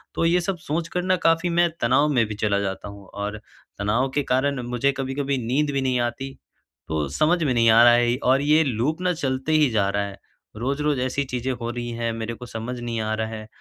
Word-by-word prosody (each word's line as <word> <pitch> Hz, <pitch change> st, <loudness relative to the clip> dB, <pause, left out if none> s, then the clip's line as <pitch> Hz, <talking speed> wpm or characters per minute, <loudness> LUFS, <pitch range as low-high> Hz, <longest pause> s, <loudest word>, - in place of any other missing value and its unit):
तो 165 Hz, -, +1 dB
ये 175 Hz, +1 st, +3 dB
सब 185 Hz, +1 st, -2 dB
सोच 165 Hz, +2 st, -3 dB
कर 180 Hz, +1 st, -2 dB
ना 185 Hz, 0 st, +2 dB
काफ़ी 165 Hz, +2 st, +2 dB
मैं 170 Hz, 0 st, +3 dB
तनाव 130 Hz, +5 st, +3 dB
में 120 Hz, -3 st, +3 dB
भी 105 Hz, -, -5 dB
चला 105 Hz, -2 st, +1 dB
जाता 100 Hz, +1 st, -4 dB
हूँ 100 Hz, -1 st, -12 dB
और 105 Hz, +1 st, -5 dB, 0.4 s
तनाव 115 Hz, +6 st, +1 dB
के 145 Hz, -, +2 dB
कारण 135 Hz, 0 st, +1 dB
मुझे 125 Hz, +3 st, +1 dB
कभी-कभी 135 Hz, +1 st, -2 dB
नींद 145 Hz, +3 st, +1 dB
भी 135 Hz, -1 st, 0 dB
नहीं 130 Hz, -2 st, +1 dB
आती, 135 Hz, +3 st, -4 dB, 0.5 s
तो 75 Hz, -2 st, -1 dB
समझ 165 Hz, -, +2 dB
में 135 Hz, -4 st, +1 dB
नहीं 115 Hz, -1 st, +4 dB
आ 115 Hz, +1 st, +7 dB
रहा 120 Hz, 0 st, +8 dB
है 120 Hz, 0 st, +3 dB
ये -, -, +1 dB
और 130 Hz, +2 st, +3 dB
ये 155 Hz, +2 st, +4 dB
लूप 135 Hz, +6 st, -1 dB
ना 180 Hz, -1 st, +2 dB
चलते 135 Hz, -1 st, -2 dB
ही 150 Hz, -3 st, +4 dB
जा 100 Hz, -3 st, +2 dB
रहा 100 Hz, 0 st, 0 dB
है। 100 Hz, -1 st, -8 dB, 0.4 s
रोज़-रोज़ 140 Hz, +4 st, -1 dB
ऐसी 130 Hz, +2 st, -1 dB
चीज़ें 125 Hz, 0 st, -3 dB
हो 120 Hz, -1 st, -5 dB
रही 120 Hz, 0 st, -5 dB
हैं 115 Hz, -1 st, -1 dB
मेरे 115 Hz, +1 st, -4 dB
को 125 Hz, +2 st, -9 dB
समझ 120 Hz, +2 st, -5 dB
नहीं 120 Hz, -1 st, -3 dB
आ 110 Hz, 0 st, -1 dB
रहा 110 Hz, 0 st, -2 dB
है 110 Hz, -1 st, -7 dB
125 Hz, 240 wpm, -24 LUFS, 115-145 Hz, 0.5 s, रहा